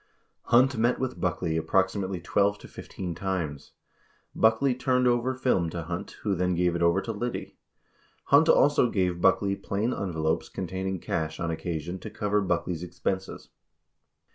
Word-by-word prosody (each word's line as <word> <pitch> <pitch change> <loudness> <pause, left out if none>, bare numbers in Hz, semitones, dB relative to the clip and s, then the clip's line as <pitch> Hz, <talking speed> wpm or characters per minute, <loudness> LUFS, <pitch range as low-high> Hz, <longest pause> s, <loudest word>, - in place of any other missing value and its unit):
32 - - -16
Hunt 130 +2 +5
met 120 +2 +2
with 130 0 -3
Buckley 90 -2 -1
approximately 95 +2 0
twelve 100 +3 +1
to - - -13
fifteen 90 -2 -7
times. 85 -6 -4 0.6
Buckley 115 +4 +3
turned 125 0 +1
over 120 +2 +1
film 125 -10 +1
to 85 0 -5
Hunt, 85 +2 -6
who 105 - +1
then 90 0 0
gave 90 0 +1
it 85 - -2
over 85 +3 +3
to 115 - -4
Liddy. 120 +3 -4 0.7
Hunt 145 +4 +5
also 145 -4 +5
gave 90 -4 0
Buckley 100 +1 +3
plain 105 +5 -2
envelopes 80 -4 -1
containing 95 +1 -3
cash 80 -1 -3
on 85 -1 -1
occasion 85 +2 -4
to - - -7
cover 105 0 0
Buckley's 90 -2 -1
expenses. 90 +2 -4
95 Hz, 155 wpm, -27 LUFS, 85-115 Hz, 0.7 s, Hunt